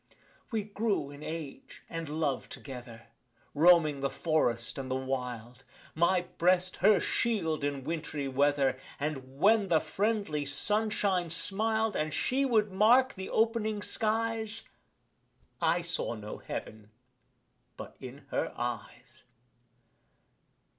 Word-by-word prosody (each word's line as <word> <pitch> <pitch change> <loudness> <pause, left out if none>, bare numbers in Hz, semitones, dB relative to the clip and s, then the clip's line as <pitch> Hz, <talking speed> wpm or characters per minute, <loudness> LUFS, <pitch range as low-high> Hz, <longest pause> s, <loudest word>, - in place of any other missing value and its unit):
We 220 -3 -1
grew 205 -7 -1
in 145 +1 -11
age 155 -3 -7
and 165 -2 -5
love 150 -4 -1
together, 120 -4 -9 0.4
Roaming 155 -2 +5
the 140 - +1
forest, 120 -8 0
and 130 -1 -5
the 130 - 0
wild; 125 -2 -4 0.3
My 170 +3 +3 0.2
breast 185 +1 +3
her 205 +2 +5
shield 165 -10 0
in 140 -2 -2
wintry 155 -2 -3
weather 135 -1 +2 0.2
And, 135 -3 -4
when 210 +4 +4
the 165 -3 +4
friendly 200 -8 -1
sunshine 195 +3 +1
smil'd 215 +6 0
And 155 -1 -1
she 270 +2 +1
would 215 -5 +2
mark 240 +7 +5
the 190 -1 -7
opening 220 -2 +1
skies, 225 0 -1 1.0
I 175 - +3
saw 170 -7 -1
no 105 -1 -7
Heaven 110 -1 -7 0.9
but - - -9
in 135 +2 -10
her - - -1
eyes. 120 +1 -6
160 Hz, 120 wpm, -30 LUFS, 135-210 Hz, 1.0 s, Roaming